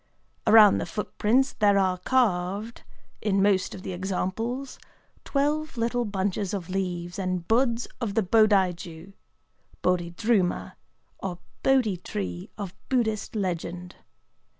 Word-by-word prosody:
Around 215 -3 +8
the - - -3
footprints 235 +5 0
there 205 -1 +3
are 185 -2 +2
carved 205 -1 0 0.4
(in 200 -2 +1
most 195 -1 +2
of 185 - -10
the 190 - -4
examples) 200 +8 -3 0.5
twelve 300 +1 0
little 235 +1 0
bunches 200 -1 -2
of 185 -2 -6
leaves 180 -2 -3
and 185 -2 -2
buds 235 +1 +2
of 210 -4 -2
the 225 - +3
Bodai 200 -2 +4
jū 170 +2 -10 0.7
("Bodhidruma"), 180 +3 +1 0.5
or 180 -2 -4 0.2
Bodhi 250 -8 +3
tree 90 - -5
of 200 -3 -5 0.2
Buddhist 225 -4 0
legend. 180 -2 -3
200 Hz, 120 wpm, -26 LUFS, 180-230 Hz, 0.7 s, Around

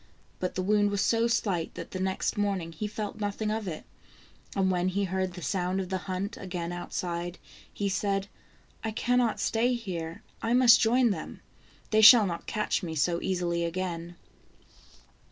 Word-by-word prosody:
But 185 - -3
the 185 - -1
wound 205 +1 +3
was 200 -1 -1
so 230 0 +2
slight 200 -8 -1
that 170 - -7
the 185 - -4
next 190 0 -1
morning 195 -5 -1
he 210 +6 -4
felt 210 0 -5
nothing 210 +1 -2
of 215 -2 -3
it. 155 -3 -5 0.7
And 190 -1 +2
when 180 0 +1
he 195 +2 0
heard 190 -1 -1
the 175 -1 -8
sound 185 +4 -1
of 185 -2 -4
the 190 -1 -1
hunt 200 +6 -3
again 175 -4 -4
outside, 175 0 -4 0.3
he 200 - -2
said: 195 0 0 0.3
" - - -33
I 225 - -1
cannot 240 +1 +1
stay 240 +3 +1
here, 170 -8 -5 0.2
I 230 +1 +1
must 250 -1 +7
join 240 +1 +4
them. - - -6 0.5
They 215 0 +4
shall 220 0 +10
not 170 -3 -4
catch 210 - 0
me 165 -4 -5
so 170 +3 +1
easily 175 -2 -1
again." 170 0 -3
190 Hz, 175 wpm, -28 LUFS, 175-215 Hz, 0.7 s, shall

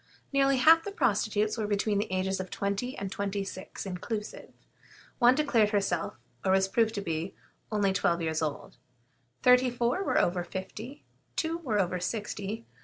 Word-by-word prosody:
Nearly 275 -1 +4
half 325 +5 +6
the 405 - -5
prostitutes 215 - +1
were 215 - -1
between 205 0 +1
the 210 -1 -2
ages 190 +1 0
of 185 -1 -4
twenty 200 +6 -2
and 195 -1 -4
twenty 200 0 -2
six 190 0 -7
inclusive. 210 +3 -5 0.7
One 245 0 +6
declared 245 -8 +3
herself, 195 -5 0 0.3
or 190 - +3
was 190 0 +3
proved 225 +2 +1
to 200 - -2
be, 165 0 -3 0.4
only 205 -2 +2
twelve 170 -2 +1
years 160 -1 -1
old; 150 -2 -4 0.7
thirty 250 0 +6
four 245 +8 0
were - - +1
over 175 0 +1
fifty; 210 +10 -7 0.3
two 330 0 -1
were 235 -11 -1
over 180 -1 0
sixty. 210 +3 -4
205 Hz, 165 wpm, -29 LUFS, 190-240 Hz, 0.7 s, half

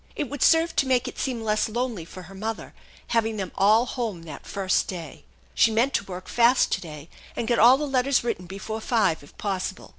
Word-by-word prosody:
It 290 -5 -3
would 285 -2 -6
serve 330 +1 +4
to 275 - +3
make 255 -1 +2
it - - -7
seem 245 -4 -2
less 215 0 0
lonely 235 -6 -3
for 185 +2 -11
her 185 +3 -13
mother, 220 +3 -5 0.4
having 225 -1 0
them 190 -3 -4
all 215 +5 +4
home 225 -10 -4
that 155 -4 -10
first 195 -2 0
day. 160 - -8 0.3
She - - +4
meant 230 +5 +1
to - - +1
work 185 -1 -8
fast 240 +2 +3
to - - 0
daj 150 -3 -9 0.3
and 230 - -3
get 235 -1 +2
all 245 +4 +7
the 300 - -2
letters 270 -1 +1
written 185 -7 -3
before 200 +4 -6
five 210 -9 +1
if 145 - -18
possible. 190 -2 -4
220 Hz, 215 wpm, -25 LUFS, 185-245 Hz, 0.4 s, all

